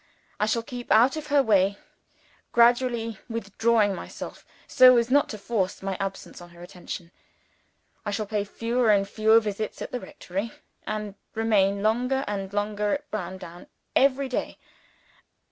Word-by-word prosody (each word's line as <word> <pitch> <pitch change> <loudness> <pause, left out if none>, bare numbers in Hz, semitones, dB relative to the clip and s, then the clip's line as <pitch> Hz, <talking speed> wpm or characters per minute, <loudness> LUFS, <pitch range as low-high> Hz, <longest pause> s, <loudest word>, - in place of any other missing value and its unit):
I 210 - +2
shall 230 +1 0
keep 245 +1 -8
out 235 +6 +5
of 310 -1 -6
her 285 -1 +4
way; 200 -3 +3 0.8
gradually 235 -2 +3
withdrawing 225 -1 +1
myself, - - -8 0.2
so 255 -1 +7
as 235 +1 +1
not 285 +2 +4
to 215 - -5
force 195 -4 -2
my 195 -1 -2
absence 195 -2 -5
on 175 - -12
her 175 0 -14
attention. 175 -1 -8 0.9
I 210 - -3
shall 210 +1 -2
pay 205 0 -1
fewer 230 +3 0
and 200 -2 +4
fewer 220 +2 +4
visits 215 -1 -4
at - - -6
the 250 - -3
rectory, 195 +1 -6 0.3
and 210 -1 -3 0.2
remain 200 -3 +2
longer 250 +5 +1
and 195 -2 -4
longer 205 0 -1
at 295 +1 -9
Browndown 180 -3 -7 0.3
every 275 0 +3
day. 255 - -3
215 Hz, 150 wpm, -26 LUFS, 200-240 Hz, 0.9 s, so